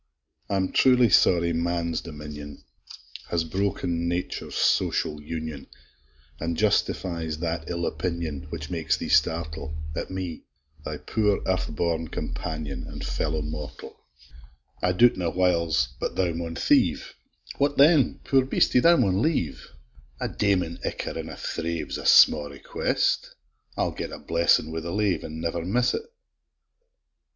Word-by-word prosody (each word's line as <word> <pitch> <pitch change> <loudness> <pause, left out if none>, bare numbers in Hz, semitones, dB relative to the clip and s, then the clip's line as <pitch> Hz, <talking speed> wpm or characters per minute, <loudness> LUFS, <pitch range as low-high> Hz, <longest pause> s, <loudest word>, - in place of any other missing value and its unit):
I'm 95 -2 0
truly 125 -3 +5
sorry 85 -3 +4
man's 85 0 -1
dominion 75 -2 -9 0.7
Has 85 -1 +1
broken 85 -1 -1
nature's 85 +1 -3
social 75 -1 +1
union, 80 -2 -6 0.7
An' 85 0 -2
justifies 85 -4 0
that 80 0 -3
ill 85 -1 -2
opinion, 85 -5 -3
Which 75 -1 -6
makes 85 -2 0
thee - - -5
startle 80 0 +1 0.2
At - - -3
me, 95 -3 -5 0.4
thy - - -4
poor 105 -2 0
earth 95 0 0
born 80 0 -1
companion, 75 -4 -5
An' - - -8
fellow 80 0 -2
mortal! 75 0 -7 0.9
I 90 - +2
doubt 120 +7 +5
na, 90 -2 0
whyles, 85 -8 +2
but - - -3
thou 90 -2 +1
may 85 0 -4
thieve; - - +2 0.5
What 145 +1 +1
then? 145 0 +5
poor 135 -1 +3
beastie, 130 -1 +3
thou 170 +5 +6
maun 100 -6 +2
live! 150 - -1 0.5
A - - -1
daimen 90 -5 0
icker - - -3
in - - -5
a - - -7
thrave 85 -1 -3
'S - - -2
a - - -3
sma' 75 -1 +7
request: 70 -1 -1 0.4
I'll - - +1
get - - -5
a - - -6
blessin' 85 -1 +2
wi' 80 - -3
the 85 +1 -6
lave, 100 -1 0
And 80 +1 -6
never 85 0 -2
miss't! 125 - 0
85 Hz, 140 wpm, -26 LUFS, 80-95 Hz, 0.9 s, sma